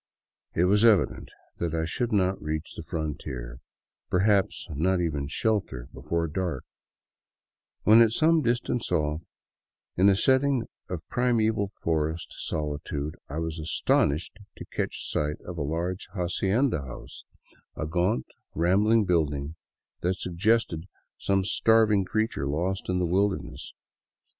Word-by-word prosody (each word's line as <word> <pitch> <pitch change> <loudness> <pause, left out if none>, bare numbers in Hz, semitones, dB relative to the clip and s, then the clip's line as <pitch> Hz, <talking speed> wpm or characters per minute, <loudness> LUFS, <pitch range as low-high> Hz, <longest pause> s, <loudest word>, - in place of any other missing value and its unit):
It 85 - +3
was 105 +3 +4
evident 105 -8 +3 0.3
that 85 -1 -1
I 80 0 0
should 120 +9 -2
not 95 -2 +1
reach 80 +1 -4
the - - -7
frontier, 70 -7 -5 0.5
perhaps 100 +2 +2
not 90 +5 +1
even 75 -5 -1
shelter, 85 - -1
before 85 0 -2
dark, 80 -3 -3 1.2
when, 110 +2 +7
at 115 -2 +5
some 160 +6 +3
distance 120 -1 -1
off, 75 +1 0 0.7
in 95 +3 +5
a 100 - +4
setting 130 +2 +2 0.2
of 85 -3 -5
primeval 110 -4 +1
forest 80 -4 -2
solitude 75 -1 -3
I 75 - -5
was 80 0 -3
astonished 80 +2 +1 0.2
to - - -8
catch - - -3
sight 75 +1 -1
of 90 -2 -6
a - - -1
large 85 +6 -2
hacienda 95 - +1
house, 60 -3 -9 0.5
a 80 - -3
gaunt, 85 -3 0 0.3
rambling 105 +7 +3
building 75 -4 0 0.4
that 90 +2 0
suggested 90 -2 0 0.3
some 95 -1 +1
starving 105 -1 +3
creature 110 -8 -1
lost 90 +8 -2
in 90 - +1
the 90 - +1
wilderness. 95 +3 -1
90 Hz, 130 wpm, -27 LUFS, 80-105 Hz, 1.2 s, when